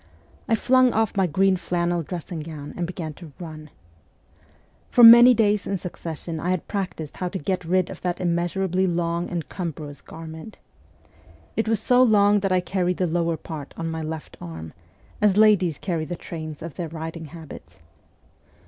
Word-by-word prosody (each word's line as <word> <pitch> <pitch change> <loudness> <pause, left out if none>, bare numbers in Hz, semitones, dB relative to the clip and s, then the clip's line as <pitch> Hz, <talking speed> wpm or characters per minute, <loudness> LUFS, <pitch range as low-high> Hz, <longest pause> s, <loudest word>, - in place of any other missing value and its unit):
I 225 - +4
flung 255 +2 +4
off 220 -1 +1
my 190 -2 +2
green 190 +4 +3
flannel 175 0 -1
dressing 170 +2 -6
gown 150 -2 -7
and 175 - -2
began 170 -4 -5
to 155 -1 -13
run. 155 -3 -9 1.2
For 245 - +5
many 240 +2 +10
days 210 -3 +2
in 195 - -1
succession 165 -2 -6
I 175 - -2
had 185 -2 -1
practised 185 -7 -4
how 180 - -2
to 190 - -4
get 185 +2 -2
rid 180 +1 +1
of 185 - -10
that 180 -1 -2
immeasurably 180 +2 0
long 170 0 -1
and 170 -3 -4
cumbrous 155 -5 -6
garment. 160 +5 -10 1.0
It 225 - 0
was 225 -2 +2
so 250 +3 +4
long 205 -4 +5
that 195 -1 -1
I 185 -1 +3
carried 180 -1 -1
the 185 - +1
lower 170 -1 0
part 150 -2 -8
on 165 0 -3
my 160 0 -4
left 155 0 -6
arm, 80 -2 -8 0.5
as 205 -2 +4
ladies 195 -8 +4
carry 170 -4 -2
the 175 - -4
trains 155 -2 -7
of 165 -3 -6
their 170 -3 -4
riding 160 +1 -6
habits. 155 - -11
175 Hz, 175 wpm, -24 LUFS, 160-195 Hz, 1.2 s, many